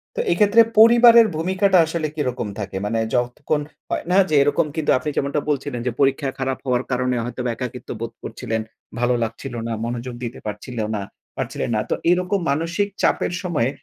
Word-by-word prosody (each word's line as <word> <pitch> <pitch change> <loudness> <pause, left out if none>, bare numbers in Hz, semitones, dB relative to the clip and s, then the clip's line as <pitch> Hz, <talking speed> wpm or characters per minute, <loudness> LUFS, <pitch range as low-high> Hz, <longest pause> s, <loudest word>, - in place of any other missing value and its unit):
তো - - -4
এই - - +3
ক্ষেত্রে 210 +2 +6 0.2
পরিবারের 235 0 +8
ভূমিকাটা 190 +4 +2
আসলে 160 -1 -2
কিরকম 125 -6 -2
থাকে? 100 -2 -4
মানে 115 +2 0 0.2
যখন 125 +5 0 0.3
হয় - - -2
না 185 - +4
যে 155 - +2
এরকম 145 +2 +2
কিন্তু 160 -2 +1
আপনি 130 +4 -3
যেমনটা 140 +1 0
বলছিলেন 140 -3 -2
যে, - - +1
পরীক্ষা 135 0 +2
খারাপ 135 0 -1
হওয়ার 125 0 +1
কারণে 125 0 0
হয়তোবা 125 +1 -3
একাকিত্ব 125 +1 -7
বোধ 115 0 -4
করছিলেন। 110 -1 -3 0.4
ভালো 120 +1 +2
লাগছিল 115 +4 -5
না, 115 - -2
মনোযোগ 120 +1 -4
দিতে 120 0 -5
পারছিল 105 +4 -6 0.2
না 105 - -2 0.4
পারছিলেন - - -3
না। 105 - +1
তো - - +1 0.2
এরকম 180 +2 +1
মানসিক 165 +7 0
চাপের 175 - +1
সময় 150 -9 0
135 Hz, 180 wpm, -21 LUFS, 120-170 Hz, 0.4 s, পরিবারের